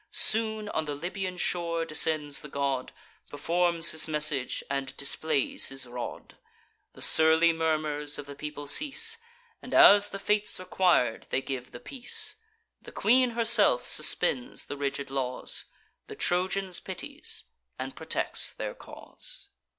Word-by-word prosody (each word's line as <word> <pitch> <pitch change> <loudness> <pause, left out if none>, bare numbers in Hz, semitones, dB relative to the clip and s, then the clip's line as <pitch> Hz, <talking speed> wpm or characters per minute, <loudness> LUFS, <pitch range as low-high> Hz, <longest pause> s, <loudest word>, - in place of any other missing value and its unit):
Soon 220 -1 +1
on 160 - -1
the 145 -1 -3
Libyan 180 +4 -4
shore 170 -2 0
descends 155 -2 0
the 150 - -9
god, 140 -2 -1 0.4
Performs 170 +3 +1
his 160 - +1
message, 150 -4 0
and 140 -1 -3
displays 140 0 0
his 135 -1 -6
rod: 120 0 -7 0.6
The - - -7
surly 160 +1 +5
murmurs 155 -2 -1
of 145 - -7
the 140 - -9
people 150 0 -7
cease; 300 - +1 0.4
And, - - -5
as 205 0 +8
the - - -5
fates 210 0 0
requir'd, 180 -10 +1
they 130 - 0
give 130 -2 -5
the 120 - -10
peace: 245 - -1 0.4
The - - -11
queen 245 +1 +3
herself 225 - +4
suspends 125 -2 0
the - - -6
rigid 140 -1 -3
laws, 130 -2 -2 0.4
The - - -8
Trojans 185 +1 +1
pities, 305 - -7 0.3
and - - -5
protects - - -1
their - - -5
cause. - - -10
160 Hz, 135 wpm, -28 LUFS, 140-200 Hz, 0.6 s, as